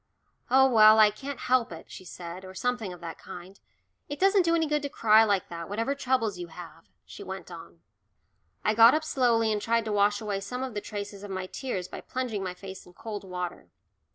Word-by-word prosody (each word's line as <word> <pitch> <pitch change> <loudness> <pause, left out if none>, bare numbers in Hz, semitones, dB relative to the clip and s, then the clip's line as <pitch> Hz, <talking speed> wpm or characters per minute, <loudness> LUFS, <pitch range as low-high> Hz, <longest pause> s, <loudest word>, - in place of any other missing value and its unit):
"Oh, 265 +1 +6
well, 220 -3 +7
I 215 -1 +7
can't 270 +5 -7
help 250 -4 +2
it," 165 - -10
she 185 - -10
said, 175 +1 -8
or 185 0 -11
something 245 -2 -2
of 180 -1 -11
that 165 -1 -7
kind. 190 +1 -11 0.5
"It 290 - -5
doesn't 390 +1 +4
do 335 -1 +2
any 325 -1 +2
good 300 -1 0
to 285 - -4
cry 220 -3 +5
like 200 -4 +1
that, 170 0 -7
whatever 230 +7 -1
troubles 250 -8 -1
you 175 - -5
have," 170 +1 -12 0.2
she - - -11
went - - -8
on. - - -11 0.8
I 215 - +3
got 230 +4 +7
up 315 - 0
slowly 235 -7 +2
and 210 - -2
tried 230 +1 +1
to 215 - -2
wash 205 0 +3
away 210 -3 -3
some 250 +6 -5
of 260 -3 -5
the 205 - -3
traces 205 -1 -7
of 205 - -8
my 185 -1 -4
tears 190 -4 -4
by - - -8
plunging 250 -6 -3
my 180 -1 -4
face 190 0 -10
in 180 - -16
cold 210 +1 -7
water. 180 -2 -6
215 Hz, 220 wpm, -27 LUFS, 190-250 Hz, 0.8 s, well